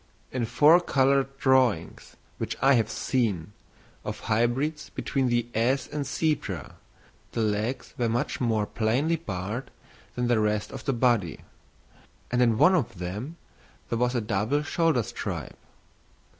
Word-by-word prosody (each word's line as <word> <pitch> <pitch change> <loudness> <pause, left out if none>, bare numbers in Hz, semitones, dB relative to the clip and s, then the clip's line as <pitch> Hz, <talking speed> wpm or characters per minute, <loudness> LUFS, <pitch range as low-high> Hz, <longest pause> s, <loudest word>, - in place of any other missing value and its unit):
In 125 -3 -1
four 150 +8 +6
coloured 135 -3 +2
drawings, 130 - +1 0.2
which - - -3
I 135 +1 +5
have 115 -4 +2
seen, 110 -6 -1 0.5
of - - -5
hybrids 120 +8 0
between 135 -2 -1
the 120 -1 +1
ass 125 +5 +1
and 150 -1 -4
zebra, 135 - -2 0.6
the 115 - -1
legs 110 +4 -1
were 120 -2 +1
much 120 +5 -1
more 110 -4 +1
plainly 125 +11 0
barred 110 - -5 0.5
than 125 0 0
the 120 -2 +3
rest 105 0 0
of 135 - -8
the 135 - +1
body; 115 - +1 0.9
and 125 0 +2
in 115 -3 +3
one 180 - +6
of 145 - 0
them 105 - -5 0.5
there 115 - -1
was 125 +1 +1
a 120 - +1
double 110 +7 0
shoulder 160 -5 +1
stripe. 100 - -5
120 Hz, 145 wpm, -27 LUFS, 110-135 Hz, 0.9 s, four